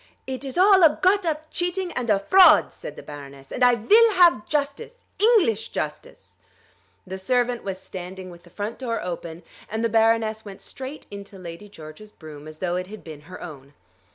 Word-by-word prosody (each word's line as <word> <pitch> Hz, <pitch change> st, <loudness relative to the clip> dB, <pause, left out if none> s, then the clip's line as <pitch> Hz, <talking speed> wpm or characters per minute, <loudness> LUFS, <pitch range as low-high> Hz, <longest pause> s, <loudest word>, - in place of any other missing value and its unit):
"It 260 Hz, 0 st, -6 dB
is 270 Hz, +1 st, -7 dB
all 380 Hz, +1 st, +6 dB
a 315 Hz, -3 st, +5 dB
got 375 Hz, 0 st, +2 dB
up 310 Hz, 0 st, -3 dB
cheating 355 Hz, +1 st, -2 dB
and 245 Hz, -5 st, -4 dB
a 205 Hz, -, +4 dB
fraud," 345 Hz, -, +5 dB
said -, -, -9 dB
the -, -, -11 dB
Baroness: 140 Hz, -2 st, -11 dB
"and 250 Hz, -, -1 dB
I 245 Hz, -1 st, +6 dB
vill 435 Hz, -, +4 dB
have 345 Hz, -, +4 dB
justice, 300 Hz, -, -3 dB
English 375 Hz, -, +3 dB
justice." -, -, -7 dB, 0.7 s
The 190 Hz, 0 st, -7 dB
servant 245 Hz, +4 st, 0 dB
was 190 Hz, -1 st, -4 dB
standing 185 Hz, 0 st, -9 dB
with 170 Hz, 0 st, -14 dB
the 175 Hz, -, -19 dB
front 205 Hz, +5 st, -6 dB
door 235 Hz, -3 st, -3 dB
open, 170 Hz, -1 st, -6 dB, 0.3 s
and 220 Hz, +1 st, -3 dB
the -, -, +1 dB
Baroness 225 Hz, 0 st, +2 dB
went 200 Hz, -2 st, -11 dB
straight 265 Hz, +3 st, -9 dB
into 200 Hz, 0 st, -10 dB
Lady 180 Hz, +3 st, -10 dB
George's 160 Hz, +4 st, -12 dB
brougham, 155 Hz, -5 st, -12 dB
as 155 Hz, 0 st, -11 dB
though 175 Hz, +1 st, -2 dB
it 180 Hz, 0 st, -4 dB
had 215 Hz, +2 st, -11 dB
been 155 Hz, -3 st, -10 dB
her 185 Hz, -, -9 dB
own. 140 Hz, -4 st, -11 dB
220 Hz, 190 wpm, -23 LUFS, 180-300 Hz, 0.7 s, all